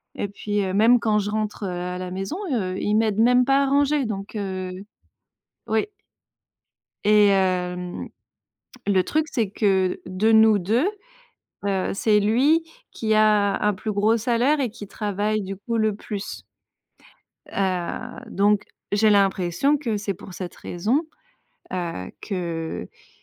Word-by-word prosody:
et 205 - -2
puis, 205 +1 -2
heu, 190 -1 -2
même 230 +4 +5
quand 215 -2 +1
je 205 0 -2
rentre, 215 -1 -3
heu, - - -2
à 180 0 -4
la 180 0 -5
maison, 195 - -4 0.2
heu, 185 -5 -1
il 210 - 0
m'aide 215 -1 +2
même 250 +2 +5
pas 275 +1 +4
à - - +2
ranger 285 0 +2
donc, 200 -1 -5
heu 190 -3 -3 1.0
Oui. 220 - +1 1.2
Et 210 0 +6
hem, 180 -2 0 0.8
le 190 -2 +4
truc 310 - 0
c'est 225 -7 -1
que 190 -3 +1
de 190 +5 +1
nous 220 -2 +6
2, 230 - +1 0.8
heu, 195 -2 0
c'est 210 +1 +3
lui 265 +11 +3 0.3
qui 220 -1 0
a 210 -2 +3
un 210 -1 +3
plus 215 +3 -4
gros 210 +3 +3
salaire 245 +6 +2
et 255 -4 0
qui 205 -2 -9
travaille 210 +1 -2
du 195 0 -5
coup 230 +4 -3
le 215 -1 +2
plus 205 -1 -6 1.1
heu, 185 -3 -2
donc, 205 +1 +2 0.3
j'ai 215 +1 +4
l'impression 195 - +2
que 235 -7 -2
c'est 200 -1 -3
pour 180 +1 -11
cette 180 -2 -6
raison, 235 - -1 0.7
heu, 170 - -4
qu’iil 165 - -5
205 Hz, 145 wpm, -23 LUFS, 190-225 Hz, 1.2 s, Et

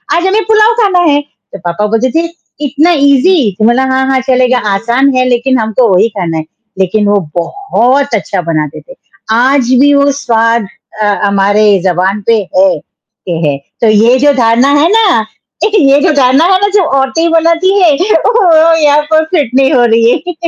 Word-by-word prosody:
"आज 345 - -1
हमें 425 +3 0
पुलाव 435 +1 +2
खाना 380 -4 +1
है।" 290 0 +1
तो 195 -8 -16
पापा 175 +5 -2
बोलते 225 +4 -1
थे, 335 +1 0 0.4
"इतना 295 +5 +1
ईज़ी।" 280 - +2
तो 215 - +1
बोला, 240 +3 +2
"हाँ, 265 0 0
हाँ 265 - +1
चलेगा।" 255 -1 +1 0.2
आसान 240 +7 0
है 255 - +1
लेकिन 250 +2 0
हमको 220 +2 0
वही 185 - +2
खाना 165 -4 -3
है, 155 - -4 0.4
लेकिन 205 +3 0
वो 205 0 +2 0.2
बहुत 275 - -1
अच्छा 195 -2 -3
बनाते 155 -2 -3
थे। - - -16 0.4
आज 250 +2 +1
भी 285 +1 +3
वो 280 0 +2
स्वाद 230 -2 0 0.3
अ, 210 - 0 0.2
हमारे 200 +1 +1 0.2
ज़बान 190 +3 -1
पे 230 - +3 0.2
है 190 +1 +4
के 175 - -14 0.2
हैं, 140 -1 -2 0.2
तो 230 - +2
ये 225 +4 +3
जो 290 +1 +2
धारणा 230 +4 +2
है 330 - +2
ना 405 - +2 0.4
ये 290 -10 +2
जो 345 - +2
धारणा 275 +2 +2
है - - +3
ना 405 - +2
जो 400 - +3 0.2
औरतें 295 +6 -1
बनाती 330 +2 +1
है, 340 - +4 0.3
वो 330 -8 +3
यहाँ 295 0 +3
पर 315 0 +3
फिट 290 -9 0
नहीं 270 +2 +2
हो 245 -3 +3
रही 230 0 +2
है। 355 +6 -3
260 Hz, 185 wpm, -9 LUFS, 220-315 Hz, 0.4 s, है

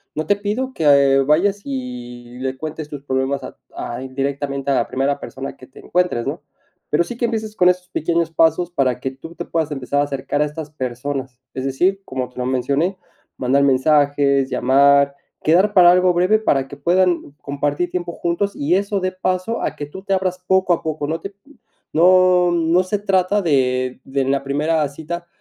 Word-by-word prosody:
no 155 - -2
te 205 - +4
pido 235 +6 -3
que 140 -3 +4
vayas 175 +9 +2
y 125 -2 -7
le 130 0 -3
cuentes 155 +1 -6
tus 145 -2 -8
problemas 135 0 -1
a - - -9 0.2
a 120 +1 -5
indirectamente 140 +1 -3
a - - +3
la - - +1
primera 140 +2 -1
persona 135 0 -7
que 130 - -14
te - - -16
encuentres, 180 -10 0
¿no?, - - -4 0.5
pero 155 +3 +3
sí 235 +7 -8
que 240 - 0
empieces 220 -2 -3
con 180 -2 +5
esos 180 0 -1
pequeños 170 0 -1
pasos 165 +2 +2
para 130 -6 0
que 130 +1 -3
tú 160 +6 -12
te 175 - -6
puedas 160 -2 -1
empezar 140 +1 -2
a - - +3
acercar 140 +1 -2
a 150 - +3
estas 150 0 -7
personas, 130 -1 -5
es 130 - -4
decir, 180 +9 +1
como 130 -1 -4
te 125 - -11
lo 125 - -1
mencioné, 140 +8 0 0.4
mandar 130 +2 +2
mensajes, 140 0 +3
llamar, 140 +2 +4 0.3
quedar 185 +6 +3
para 175 -2 +8
algo 180 0 +4
breve 180 +5 +3
para 135 -11 +1
que - - -10
puedan 175 -4 +1
compartir 145 +5 -2
tiempo 175 -1 -3
juntos 175 +5 -2
y 145 +5 0
eso 200 +1 0
dé 185 0 -1
paso 185 +4 -2
a - - -2
que 145 - -5
tú 190 - -10
te 195 - -1
abras 185 -1 -1
poco 190 -1 +3
a - - -1
poco, 155 -2 -3
no 160 +2 -2
te 195 - -5
p 200 - -38 0.6
no, 180 +1 +5
no 170 +2 +2
se 200 +2 -2
trata 195 0 +1
de 130 -6 0
de 135 0 -1
en 130 - -1
la 140 0 0
primera 150 +2 0
cita 170 +4 -7
150 Hz, 200 wpm, -20 LUFS, 135-180 Hz, 0.6 s, para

